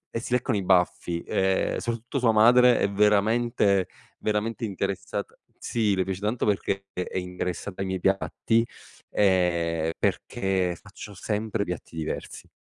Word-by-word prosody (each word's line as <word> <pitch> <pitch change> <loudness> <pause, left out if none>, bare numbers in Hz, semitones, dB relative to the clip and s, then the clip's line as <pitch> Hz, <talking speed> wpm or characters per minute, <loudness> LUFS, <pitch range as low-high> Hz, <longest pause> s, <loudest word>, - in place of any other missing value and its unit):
e - - +1
si 120 - -4
leccano 125 -1 +1
i 100 - -2
baffi, 90 -2 +1
ehm, 95 0 +1
soprattutto 120 +3 -3
sua 120 -3 +4
madre 120 +3 +6
è - - +2
veramente, 105 0 +3 0.3
veramente 110 +3 -1
interessata 100 -1 -4 0.2
sì 105 -4 0
le 95 - +1
piace 95 -1 -4
tanto 110 +4 -1
perché 100 -1 0
è 90 +1 -4
interessata 90 +1 -4
ai 95 - -1
miei 95 0 -2
piatti, 95 +4 +1 0.5
ehm, 85 -4 +2
perché 95 -2 -1
faccio 100 +1 -11
sempre 105 +2 -2
piatti 90 -1 -6
diversi. 80 -1 -5
100 Hz, 140 wpm, -26 LUFS, 90-110 Hz, 0.5 s, madre